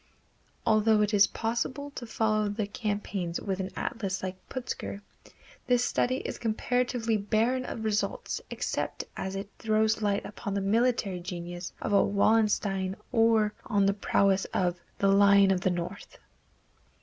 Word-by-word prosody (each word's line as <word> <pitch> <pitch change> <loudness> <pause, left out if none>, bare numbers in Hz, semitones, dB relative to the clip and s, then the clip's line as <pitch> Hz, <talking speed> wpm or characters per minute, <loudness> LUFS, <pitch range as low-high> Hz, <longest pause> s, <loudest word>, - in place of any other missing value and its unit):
Although 215 0 +4
it 210 +1 -1
is 200 -1 +6
possible 255 +5 -3
to 245 -4 -7
follow 215 -2 +1
the 205 +1 -2
campaigns 205 -4 -3
with 195 -2 -3
an 190 0 -2
atlas 195 -4 -3
like 185 0 -3
Putzger, 250 -5 -5 0.7
this 245 -1 +3
study 255 +1 +1
is - - -4
comparatively 235 0 0
barren 230 +5 +1
of 225 - -5
results 215 -1 -1
except - - -3
as 190 0 -4
it 200 +1 -5
throws 220 0 +2
light 205 -1 0
upon 200 -1 -5
the - - +1
military 210 -2 +1
genius 175 0 -6
of 205 - -1
a 200 - +6
Wallenstein 200 -2 +2 0.2
or 225 -2 +3
on 205 -4 +2
the 200 - +3
prowess 195 -1 +2
of 175 -1 -1 0.2
"The 200 - +2
Lion 200 0 +6
of 185 -2 +1
the 185 - +2
North." 180 +3 -5
205 Hz, 150 wpm, -28 LUFS, 195-225 Hz, 0.7 s, is